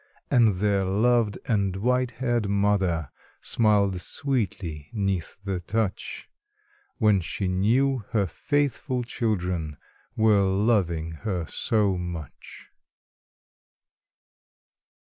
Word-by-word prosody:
And 115 -7 +5
their 100 0 +1
loved 110 +3 +2
and 100 -4 +1
white 125 +5 +1
haired 120 -5 -1
mother 100 -6 +1 0.3
Smiled 100 -5 +2
sweetly 95 - -2
'neath 100 -6 -2
the 95 -3 -2
touch, 100 +2 -3 0.7
When 105 -3 +3
she 95 +3 -3
knew 120 +9 +2
her 105 -4 +1
faithful 140 - -1
children 90 - -2 0.4
Were 110 -2 +4
loving 95 -5 +1
her 95 -6 -2
so 105 -1 0
much. 85 -5 -8
100 Hz, 90 wpm, -26 LUFS, 90-115 Hz, 0.7 s, And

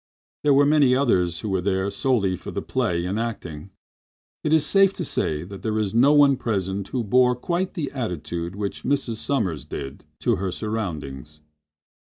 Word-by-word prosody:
There 145 -2 +4
were 140 +1 +5
many 145 -3 +4
others 90 -11 +1
who 110 - -4
were 95 -2 0
there 95 +1 0
solely 105 -9 +1
for - - -9
the - - -4
play 85 0 -1
and 95 +4 -2
acting. 95 -8 -5 0.7
It 150 - 0
is 160 -2 +4
safe 195 +3 +4
to 175 - -4
say 75 - -1
there 100 +4 -5
was 105 -3 -1
no 125 +5 +5
one 145 -2 +5
present 95 -4 -2
who 125 +1 -2
bore 125 +4 +4
quite 175 +8 -2
the 150 -5 -3
attitude 85 - -4
which 100 -1 -4
Mrs. 135 -4 0
Sommers 105 - -1
did 70 -1 -7 0.2
to - - +2
her 95 +1 -2
surroundings. 75 -9 -5
105 Hz, 175 wpm, -24 LUFS, 90-135 Hz, 0.7 s, were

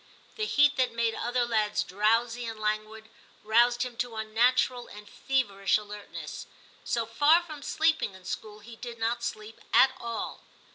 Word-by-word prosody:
The 430 -1 -2
heat 290 -5 +4
that 255 -1 +2
made 230 -1 0
other 240 +2 0
lads 215 -3 +1
drowsy 230 +5 +1
and 225 -1 -6
languid, 215 +1 -3 0.4
roused 240 +3 +4
him 250 -2 -6
to 240 -1 -3
unnatural 240 +3 +1
and 210 0 -12
feverish 205 -5 0
alertness; 210 -1 -8 0.4
so 235 -1 -1
far 290 +9 +4
from 305 -4 -9
sleeping 315 -9 +1
in 185 -1 -15
school, 210 +2 -6
he 230 +2 -11
did 240 -1 -8
not 230 +1 -1
sleep 215 -1 -6
at 265 - +6
all. 235 -1 -5
230 Hz, 155 wpm, -28 LUFS, 215-245 Hz, 0.4 s, at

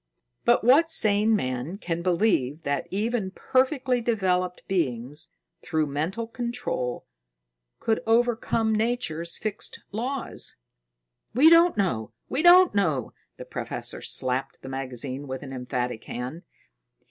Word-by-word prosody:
"But - - +4
what 285 +8 +5
sane 215 -6 +4
man 130 +1 -3
can 170 -4 -3
believe 170 - +1
that 140 -1 -1
even 215 +1 -1
perfectly 255 +4 +1
developed 185 -6 0
beings, 150 -3 -2 0.3
through 155 -1 0
mental 160 +10 -2
control, 235 - -3 0.7
could 220 -1 0
overcome 225 -1 +2
Nature's 175 -8 -1
fixed 215 -2 -4
laws?" 250 +5 -3 0.8
"We 305 +6 +7
don't 335 +1 +6
know! 120 - -1 0.2
We 275 - 0
don't 355 +1 +7
know!" 155 - 0 0.2
The - - -8
professor - - -6
slapped 130 +1 -1
the 130 - -7
magazine 130 +1 -4
with 130 +1 -5
an 135 -1 -8
emphatic 125 -2 -3
hand. 125 +8 -6
185 Hz, 120 wpm, -26 LUFS, -, 0.8 s, We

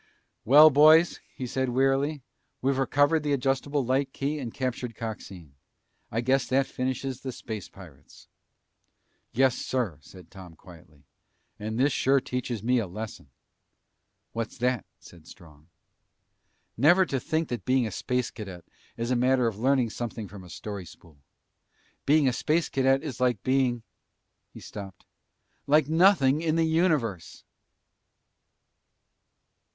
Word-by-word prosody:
"Well, 150 +6 +8
boys," 155 +4 +6 0.2
he 130 - -5
said 130 +1 -2
wearily, 135 +3 +1 0.4
"we've 135 +1 0
recovered 145 +4 +2
the 145 -1 -1
adjustable 135 +1 0
light 130 +2 0
key 145 +2 -2
and 120 -4 -5
captured 125 -3 -4
Coxine. 95 -9 -8 0.6
I 115 - -1
guess 130 +2 +1
that 135 +2 +2
finishes 130 0 -4
the 130 - -5
space 110 -4 -7
pirates!" 75 -8 -16 1.0
"Yes, 130 +1 +2
sir," 115 - -3
said 90 +3 -15
Tom 90 -4 -12
quietly. 80 -4 -17 0.6
"And 110 +1 -4
this 135 +2 +2
sure 135 +1 +3
teaches 125 -4 -4
me 125 +1 +2
a 110 - -3
lesson." 105 -6 -8 1.0
"What's 115 -1 -4
that?" 125 -3 0
said 85 -3 -16
Strong. 75 -4 -16 1.1
"Never 175 - +5
to 135 -6 -2
think 160 +4 -2
that 120 -6 -4
being 130 -1 +2
a 110 - -4
Space 125 -1 -2
Cadet 95 -6 -9 0.3
is 115 +2 -2
a - - +2
matter 125 +1 +2
of 110 -3 -2
learning 130 -2 +2
something 115 -2 -5
from 100 -2 -11
a 90 - -13
story 100 +1 -7
spool. 80 -3 -17 0.9
Being 150 -1 +4
a 125 - +2
Space 155 +6 0
Cadet 135 +1 +2
is 140 -6 -6
like 125 -5 +1
being 130 -3 +1 0.3
" - - -52
He - - -10
stopped. 95 -3 -10 0.6
"Like 150 0 +4
nothing 160 -4 +4
in 160 -1 0
the 165 0 +2
universe!" 155 - 0
125 Hz, 140 wpm, -27 LUFS, 110-140 Hz, 1.1 s, Well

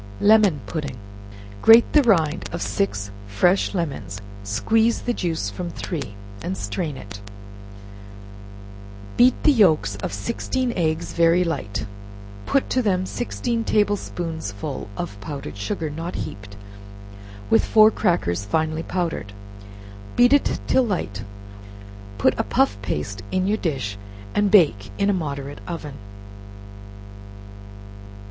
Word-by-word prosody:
Lemon 205 -8 +5
Pudding. 145 -2 -4 0.6
Grate 225 +1 +7
the 300 - +7
rind 160 - +2
of - - -3
six 100 0 -2 0.2
fresh 175 - +2
lemons, 135 - -3 0.2
squeeze 220 - +1
the 245 - -1
juice 165 - -2
from 175 - -5
three, 145 - -5 0.3
and 95 - -3
strain 130 - -3
it; 100 -2 -10 1.9
beat 250 +1 +5
the 305 - +6
yelks 155 - +3
of - - -4
sixteen 240 - -2
eggs 160 -2 -1
very 170 +1 +4
light, 105 - -3 0.6
put 275 - +2
to 255 - +2
them 185 -5 +1
sixteen 235 +1 -2
table 205 -2 +2
spoonsful 160 - -5
of 100 0 -5
powdered 140 +3 -6
sugar, 155 - -3
not 165 +4 -5
heaped, 100 0 -7 0.9
with 110 - +5
four 215 0 +6
crackers 100 - 0
finely 155 +8 -1
powdered; 165 - -3 0.8
beat 245 +2 +5
it 285 - +2
till 260 - +3
light; 170 - -2 0.9
put 95 - +3
a - - +3
puff 100 - +2
paste 95 +1 -3
in 185 0 +1
your 210 +2 +1
dish 130 - -3 0.3
and 205 -1 +2
bake 150 - +4
in 200 0 +2
a - - +1
moderate 145 -5 -4
oven. 160 -4 -5
160 Hz, 125 wpm, -23 LUFS, -, 1.9 s, Grate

